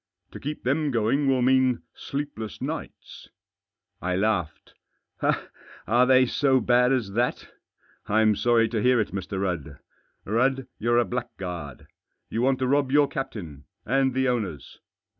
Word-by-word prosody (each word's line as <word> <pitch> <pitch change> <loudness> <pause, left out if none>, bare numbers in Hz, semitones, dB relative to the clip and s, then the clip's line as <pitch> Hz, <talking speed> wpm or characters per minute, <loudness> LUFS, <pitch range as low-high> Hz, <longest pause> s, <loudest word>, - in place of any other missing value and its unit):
To - - -9
keep 150 +2 -5
them 145 +4 +1
going 130 +4 +1
will 130 -2 +2
mean 130 -1 +3
sleepless 140 -8 -5
nights." - - -7 0.7
I 90 0 -1
laughed. 95 -5 -1 0.6
" - - -12
Are 120 +4 +4
they 130 0 +6
so 130 +1 +2
bad 125 0 +3
as 120 -7 0
that? 120 +4 -1 0.6
I'm 110 0 +3
sorry 115 +1 +3
to 110 -2 -1
hear 125 +1 +4
it, 110 - 0
Mr. 95 0 -4
Rudd. 90 -7 -3 0.5
Rudd, 130 +5 +1
you're 120 +2 +2
a 120 - +4
blackguard. 90 -7 -6 0.5
You 115 - -1
want 130 +1 +2
to 130 - -1
rob 140 0 +2
your 145 0 +5
captain 100 - -6
— - - -51
and 135 -1 +1
the 130 0 +2
owners." 100 - -3
120 Hz, 150 wpm, -25 LUFS, 105-130 Hz, 0.7 s, they